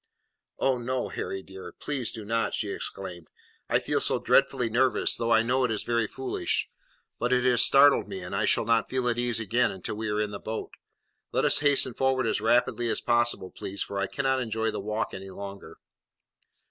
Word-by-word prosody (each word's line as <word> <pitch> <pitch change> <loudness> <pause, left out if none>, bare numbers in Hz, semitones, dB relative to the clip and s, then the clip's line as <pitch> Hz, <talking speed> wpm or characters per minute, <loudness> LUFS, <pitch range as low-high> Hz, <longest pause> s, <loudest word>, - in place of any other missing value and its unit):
"Oh 130 -2 +1
no, 125 +1 -2
Harry, 95 - -5
dear! 95 -2 -10
please 135 -5 -2
do 110 -2 -8
not," 115 +1 0
she 105 -2 -2
exclaimed; 90 -5 -6 0.4
"I - - +4
feel - - -1
so - - +3
dreadfully 120 - +2
nervous, 120 +3 +2
though 115 -1 -2
I 115 0 +5
know 125 +3 +1
it 125 - +1
is 110 -2 -2
very 115 -2 0
foolish. 130 +4 -2 0.5
But 120 - 0
it 125 0 +2
has 125 -1 +4
startled 140 -3 +5
me, 95 -2 -6
and 90 +2 -6
I - - +1
shall - - +2
not 115 0 +2
feel 130 -1 -1
at 120 0 -1
ease 120 -2 0
again 115 +3 +1
until 95 +1 -6
we 110 0 -3
are 105 0 -1
in 105 -1 -1
the 100 - -6
boat. 110 0 -5 0.6
Let - - +1
us - - +5
hasten 145 -3 +3
forward 130 0 +1
as 110 - 0
rapidly 120 +1 +2
as - - +1
possible, 120 -6 +1
please, 100 +1 -5
for 100 - -5
I 100 - 0
cannot 135 -1 0
enjoy 110 -1 -1
the - - -4
walk 105 +2 -3
any 95 +1 -7
longer." 100 -3 -9
115 Hz, 205 wpm, -27 LUFS, 100-125 Hz, 0.6 s, I